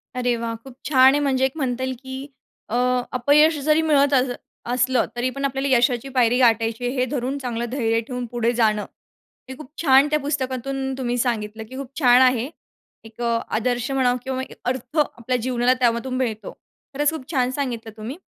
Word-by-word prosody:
अरे 245 -1 +1
वाह! 230 0 -3
खूप 265 -2 -12
छान 265 -2 +6
आहे. 290 - +2
म्हणजे 265 -2 +2
एक 265 - 0
म्हणता 260 -3 -2
येईल, 260 0 -2
की 265 +1 -7 0.4
अ, 230 - -2 0.4
अपयश 295 +5 +4
जरी 310 +1 +4
मिळत 285 -3 +3
अस 260 -1 +3 0.4
असलं, 250 +1 +2
तरीपण 255 +3 -2
आपल्याला 270 0 -1
यशाची 245 +1 +1
पायरी 245 -1 +3
गाठायची 230 -1 +2
आहे, 245 - -1
हे 255 -1 +1
धरून 270 0 -2
चांगलं 240 -3 -3
धैर्य 230 -4 +1
ठेवून 250 -2 -4
पुढे 235 -1 +1
जाणं. 215 -3 +1 0.6
हे 260 - -6
खूप 305 -4 -11
छान 275 -2 +5
त्या 305 0 +1
पुस्तकातून 270 -1 -3
तुम्ही 245 -2 -2
सांगितलं 220 -3 -2
की 260 - -9
खूप 275 -2 -6
छान 250 -3 +6
आहे. 255 0 +3 0.6
एक 225 +2 -12
अ, 235 -1 +1 0.2
आदर्श 245 +2 -1
म्हणा 260 -2 +2
किंवा 260 0 -3
एक - - -13
अर्थ 255 +4 -5
आपल्या 255 -4 0
जीवनाला 250 +1 +2
त्यामधून 240 +1 +1
मिळतो. 230 -4 -3 0.4
खरंच 290 +1 +2
खूप 310 -3 -8
छान 255 -3 +1
सांगितलं 245 -5 -4
तुम्ही 225 +7 -6
255 Hz, 185 wpm, -22 LUFS, 240-270 Hz, 0.6 s, छान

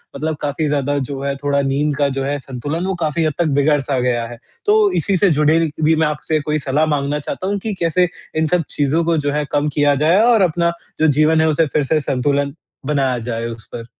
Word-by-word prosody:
मतलब 155 +2 -2
काफ़ी 150 +1 -1
ज़्यादा 145 0 0
जो 135 0 -5
है 140 0 -1
थोड़ा 140 0 +1
नींद 140 +2 0
का 145 -1 +2
जो - - -1
है 145 +1 -1
संतुलन, 145 +6 -5
वो 190 -1 -1
काफ़ी 160 -1 -1
हद 155 - 0
तक 170 - +2
बिगड़-सा 140 -2 +1
गया 120 -2 0
है। 120 0 -10 0.3
तो 420 -1 +4
इसी 195 -2 +1
से 200 - +3
जुड़े 155 +2 +4 0.2
भी 160 +1 +4
मैं 160 0 +2
आपसे 150 +1 -1
कोई 150 +1 -1
सलाह 145 +3 +1
माँगना 145 +1 -2
चाहता 185 +5 -5
हूँ 200 +1 0
कि 220 - -2
कैसे 175 +2 +2 0.3
इन 160 - +2
सब 175 +1 +1
चीज़ों 150 +4 0
को 165 -1 +1
जो 145 -1 -1
है, 150 0 -1
कम 145 +1 +1
किया 145 -1 +3
जाए 180 +6 +4
और 235 -2 +4
अपना 170 -1 +2 0.3
जो 160 - +4
जीवन 155 +2 +3
है 160 - +3
उसे 155 +1 +2
फिर 150 - +2
से 155 +3 +1
संतुलन 140 +1 0 0.3
बनाया 135 -4 +1
जाए 115 0 -4
उस 115 -1 -9
पर। 115 - -6
150 Hz, 230 wpm, -18 LUFS, 140-160 Hz, 0.3 s, तो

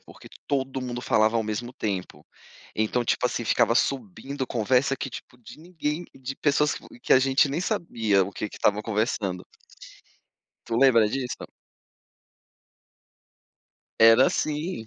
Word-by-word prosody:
porque - - -15 0.2
todo 135 -2 -1
mundo 120 -1 -4
falava 110 -1 +2
ao 115 - +1
mesmo 110 +3 -4
tempo. 100 -7 -5 0.5
Então, 110 +3 0
tipo 120 - 0
assim, 120 -1 -1
ficava 115 +1 +2
subindo 130 +2 -2
conversa, 130 +4 +1
que - - -4
tipo, 125 0 -11
de 120 - -14
ninguém, 160 -1 -4
de 135 +1 -7
pessoas 150 0 +2
que - - -10 0.2
que - - +1
a - - +8
gente 135 +2 +3
nem 150 +5 -2
sabia 110 - +1
o 100 - -8
que 105 - -4
que - - -12
estava 105 0 +1
conversando. 105 -4 -2 1.2
Tu 115 - -2
lembra 115 -4 +5
disso? 125 +2 -4 2.5
Era, 115 +3 +7
assim, 155 -4 -2
125 Hz, 140 wpm, -25 LUFS, 110-135 Hz, 2.5 s, a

